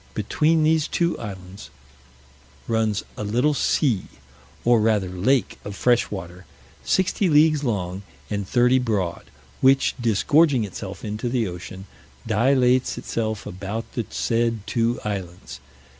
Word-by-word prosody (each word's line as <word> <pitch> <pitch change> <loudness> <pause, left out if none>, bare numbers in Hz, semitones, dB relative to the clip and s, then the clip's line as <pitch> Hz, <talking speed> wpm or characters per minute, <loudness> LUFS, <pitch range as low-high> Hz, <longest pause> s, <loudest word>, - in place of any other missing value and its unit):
Between 155 +9 +1
these 155 -1 +2
two 170 0 0
islands 95 -2 -9 1.0
runs 110 -3 0
a - - -4
little 125 +9 +1
sea, 130 -7 +1 0.6
or 120 -2 +4
rather 105 -4 +1
lake 105 +8 0
of 100 -1 -7
fresh 120 +2 +2
water, 90 -2 -8 0.4
sixty 190 0 +1
leagues 150 -1 +4
long, 95 -6 -2 0.3
and 100 -2 -3
thirty 125 +1 +4
broad; 100 -8 -2 0.4
which 135 +1 +4
disgorging 130 +4 +3
itself 100 0 -7
into 105 +3 -3
the 120 -3 0
ocean, 95 +2 -8 0.4
dilates 125 +2 +2
itself 110 -2 -3
about 100 +5 -6
the 120 - -3
said 115 -2 -1
two 115 0 0
islands. 90 -8 -5
115 Hz, 125 wpm, -23 LUFS, 100-130 Hz, 1.0 s, or